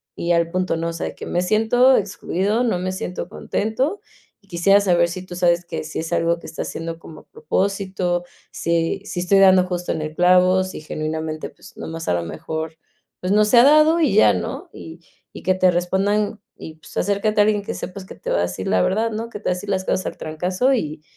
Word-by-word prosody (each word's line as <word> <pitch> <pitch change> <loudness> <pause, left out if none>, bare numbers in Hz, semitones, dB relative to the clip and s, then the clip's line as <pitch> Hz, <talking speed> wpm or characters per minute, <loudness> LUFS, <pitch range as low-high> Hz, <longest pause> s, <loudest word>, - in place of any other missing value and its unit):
y 170 - -2
al 170 -1 +2
punto, 185 -1 -1
¿no?, 165 +1 -2
o - - -5
sea, 165 - -4
de - - -8
que - - -8
me 175 - -1
siento 225 +7 +4
excluido, 205 +2 -1
no 225 -7 0
me 185 +1 -2
siento 180 -1 -5
contento. 260 - -2 0.5
Quisiera 195 +4 +4
saber 175 -3 +3
si 180 +2 -6
tú 180 - -9
sabes 175 -1 +2
que - - -5
si 155 - -5
es 160 - -5
algo 170 0 +1
que - - -11
está 160 - -5
haciendo 165 0 -5
como 160 - -12
a - - -28
propósito, 195 - -1 0.3
si 170 +3 -1
si 195 -3 -4
estoy 190 +2 +3
dando 190 -1 +6
justo 180 -1 -3
en 160 - -2
el 155 0 -5
clavo, 180 +1 +4
si 185 -3 -7
genuinamente, 155 0 -4
pues, - - -17
nomás 165 0 -6
a - - +2
lo 85 - -2
mejor, 160 - -5 0.4
pues, 180 - -2
no 210 +1 +5
se 225 +3 +3
ha - - +8
dado 305 +4 +5
y 300 - +2
ya, 105 -1 +6
¿no? 90 -2 -5
Y 165 +1 -10 0.3
y - - -10
que 185 - +3
te 185 -1 +4
respondan 200 +4 0 0.2
y, 160 - -9
pues, 160 - -13
acércate 205 +2 0
a - - +7
alguien 210 -1 +1
que - - -4
sepas 190 +1 -7
que - - -11
te - - -5
va - - +2
a - - +2
decir 90 +1 -4
la 90 - +2
verdad, 220 - +1
¿no? 225 +2 -4
Que 210 - -8
te - - -23
va - - +2
a - - +3
decir 200 +3 -8
las 190 -1 -1
cosas 185 - -1
al - - -6
trancazo, 180 - 0
y 155 - -3
180 Hz, 235 wpm, -21 LUFS, 165-205 Hz, 0.5 s, ha